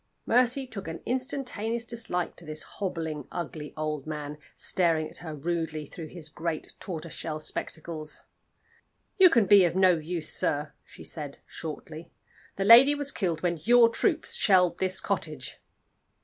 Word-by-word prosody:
Mercy 250 +3 +3
took 215 -8 -8
an 165 0 -5
instantaneous 245 -3 -2
dislike 225 -7 -2
to - - -6
this 155 -1 -6
hobbling, 160 -7 -4
ugly 155 -3 -5
old 155 -2 -3
man, 150 -1 -5 0.2
staring 165 -4 +1
at - - -9
her 160 -3 -7
rudely 160 0 -3
through 165 +2 -8
his 160 -1 -6
great 160 0 -4
tortoiseshell 160 -2 -5
spectacles. 155 0 -4 0.9
"You 370 -1 +9
can 235 -9 +4
be 200 -1 +7
of 170 -1 +1
no 185 -3 +5
use, 160 0 -3
sir," 150 +1 0
she - - -13
said, 145 -4 -6
shortly. 160 +1 -8 0.5
"The 195 - -1
lady 250 +7 +9
was 285 -1 +2
killed 175 -6 -2
when 170 -2 0
your 235 +4 +6
troops 320 - 0
shelled 180 -3 +4
this 185 0 0
cottage." 155 -9 -4
170 Hz, 150 wpm, -28 LUFS, 155-215 Hz, 0.9 s, You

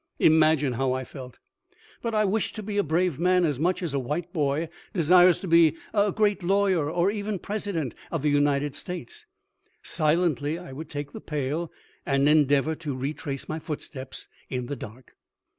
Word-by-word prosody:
Imagine 155 -4 +4
how 130 +1 0
I 130 0 -2
felt! 130 -2 -10 0.6
But 230 -2 -2
I 215 0 +3
wished 205 +2 -1
to 215 - -5
be 205 0 -2
a - - +3
brave 165 -1 0
man 180 0 +3
as 145 -5 -1
much 180 +3 0
as 165 -5 -3
a 140 - +1
white 155 +7 -3
boy 150 0 0 0.3
desires 175 0 +5
to 190 - -5
be 165 -2 +5 0.2
a 205 -1 +3
great 205 -2 +1
lawyer 190 -4 +2
or 175 +4 +2
even 205 -1 -3
President 195 - -3 0.2
of 165 -4 -3
the 150 - +3
United 145 0 +2
States. 180 - -7 0.6
Silently 155 -2 +1
I 175 -6 -9
would 155 +3 -8
take 145 -1 -5
the - - -8
pail 150 +3 -3 0.3
and 140 0 +2
endeavor 150 0 +4
to 145 -5 -4
retrace 140 0 -4
my 155 - -3
foot 150 -1 -5
steps 130 -2 -8 0.2
in 125 -2 -3
the 145 - -4
dark. 120 +1 -11
160 Hz, 180 wpm, -26 LUFS, 140-180 Hz, 0.6 s, desires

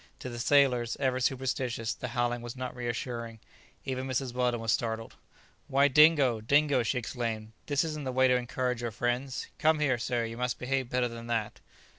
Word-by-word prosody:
To 125 - -7
the 120 -1 -6
sailors, 125 -3 +3
ever 130 -1 +1
superstitious, 125 -2 -1
the 125 - -6
howling 120 0 -1
was 120 +1 -7
not 130 -1 -5
reassuring. 120 -1 -4 0.5
Even 130 -1 -3
Mrs. 130 -1 -2
Weldon 125 -1 +1
was 115 -1 0
startled. 115 -1 -2 0.5
"Why, 140 +1 +4
Dingo, 145 -5 +5
Dingo," 140 +3 +3
she 120 +3 -1
exclaimed, 115 -3 -3 0.2
"this 145 -2 +2
isn't 155 -2 -4
the 130 - -1
way 130 +1 +4
to 125 - +4
encourage 125 0 -1
your 120 - -2
friends. 120 +4 -2
Come 160 -1 +4
here, 130 -5 +1
sir; 120 0 -1
you 115 0 -6
must 125 -1 -1
behave 130 0 -1
better 125 0 +1
than 115 0 -8
that!" 115 -3 -2
125 Hz, 185 wpm, -29 LUFS, 120-130 Hz, 0.5 s, Dingo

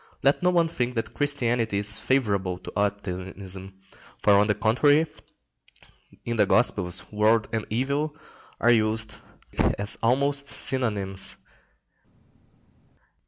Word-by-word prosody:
Let 140 +1 +3
no 180 - +3
one 170 -2 +3
think 125 -6 -3
that 115 - -3
Christianity 120 -7 -1
is 100 0 +1
favourable 100 -9 0
to 90 - -11
optimism; 95 -1 -4 0.5
for, 105 - +5
on 100 +1 +4
the 105 - +1
contrary, 145 +8 +3 1.2
in 120 -1 -2
the 105 -2 +3
Gospels 90 -6 +1
world 110 +1 +2
and 110 -1 -2
evil 140 +6 -1 0.4
are 120 - +4
used 110 -1 +1 0.6
as 100 +1 0
almost 140 +4 +1
synonymous. 105 -9 0
110 Hz, 115 wpm, -25 LUFS, 100-130 Hz, 1.2 s, for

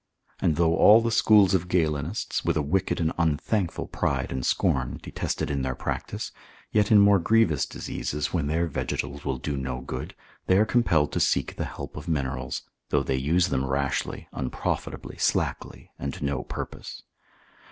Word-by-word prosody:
And 80 - +2
though 85 0 +3
all 105 +5 +8
the 115 0 -1
schools 105 -4 +5
of 90 -1 +1
Galenists, 80 +1 -1
with - - +1
a 75 - +1
wicked 95 +6 0
and 80 -1 0
unthankful 85 +4 0
pride 65 -2 -1
and 65 -1 -3
scorn, 65 0 0
detest - - -3
it - - -2
in 70 -1 -1
their 65 -1 -2
practice, - - -4 0.4
yet 105 0 +2
in 110 - +8
more 100 -1 +6
grievous 90 -6 +3
diseases, 75 0 -4
when 80 -5 0
their 80 +3 +1
vegetals 70 -2 -3
will 65 -2 -2
do 70 +3 -3
no 65 -2 -3
good, 65 - -6 0.3
they 95 - +5
are 105 - +5
compelled 85 -11 +2
to - - -1
seek - - +1
the - - -3
help - - -8
of - - -8
minerals, 65 -5 -2 0.3
though 70 -1 +2
they 65 -1 -1
use 80 +7 +2
them 65 -1 0
rashly, 70 0 -2
unprofitably, 65 - -4
slackly, - - -1
and 70 - -4
to - - -4
no 70 -1 -1
purpose. - - -7
75 Hz, 175 wpm, -26 LUFS, 70-95 Hz, 0.4 s, all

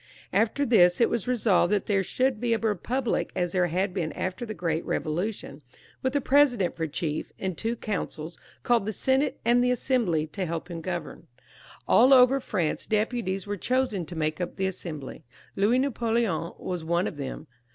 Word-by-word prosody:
After 230 +6 +2
this 180 -7 +5
it 235 - +3
was 235 -2 -2
resolved 215 -7 +2
that 205 -2 +1
there 200 -2 +2
should 255 +5 0
be 240 -1 +1
a - - 0
republic, 230 +4 -1
as 175 -1 0
there 180 -1 +2
had 185 +3 -1
been 170 -5 -2
after 190 +6 -4
the 215 - -5
great 165 -1 -1
Eevolution, 160 -2 -3 0.4
with 260 +1 -1
a 285 - +2
president 260 -9 +3
for 165 -1 -2
chief, 155 0 -3
and 190 -2 -3
two 225 +7 -2
councils, 170 -7 -4 0.3
called 235 -4 +2
the 215 - -1
Senate 265 +4 +1
and 240 +1 +4
the 250 - +2
Assembly, 235 - +1
to 180 +4 -4
help 165 +1 -4
him 165 -1 -5
govern. 175 -2 -5 0.6
All 260 +3 +7
over 255 +2 +6
France 180 -11 -2
deputies 215 -3 -1
were 205 0 -3
chosen 245 -6 0
to 175 - -8
make 155 +1 -1
up 175 - -4
the 190 - -1
Assembly. 165 -7 -6 0.3
Louis 210 +5 +3
Napoleon 230 - 0
was 180 -3 -4
one 170 +2 +1
of - - -4
them. 140 +2 -6
195 Hz, 185 wpm, -27 LUFS, 170-240 Hz, 0.6 s, All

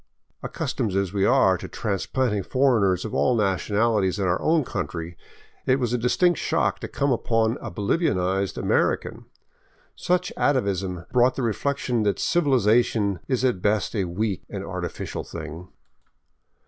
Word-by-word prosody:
Accustomed 100 -4 -3
as 100 -2 0
we 100 -1 +1
are 95 -9 +4
to - - -7
trans 100 -4 -3
planted 115 -7 -1
foreigners 115 -9 +2
of 110 - -6
all 125 - +2
nationalities 105 0 +1
in 100 - -1
our 90 0 0
own 160 -1 +2
country, 85 -5 -4 0.5
it 130 - +5
was 120 -2 -1
a - - +2
dis 125 +2 0
tinct 175 -3 +4
shock - - 0
to - - -5
come 140 0 -1
upon 115 0 +1
a - - -5
Bolivianized 100 - 0
American. - - 0 0.7
Such 180 0 0
atavism 95 -9 0
brought 125 0 +3
the 135 - -2
reflection 125 +1 -1
that 105 -2 +1
civilization 115 - +2
is 130 -1 0
at 120 -8 0
best 105 +1 0
a 100 -3 0
weak 95 +2 -2
and - - -5
artificial - - -5
thing. 85 +4 -8
110 Hz, 150 wpm, -24 LUFS, 95-130 Hz, 0.7 s, it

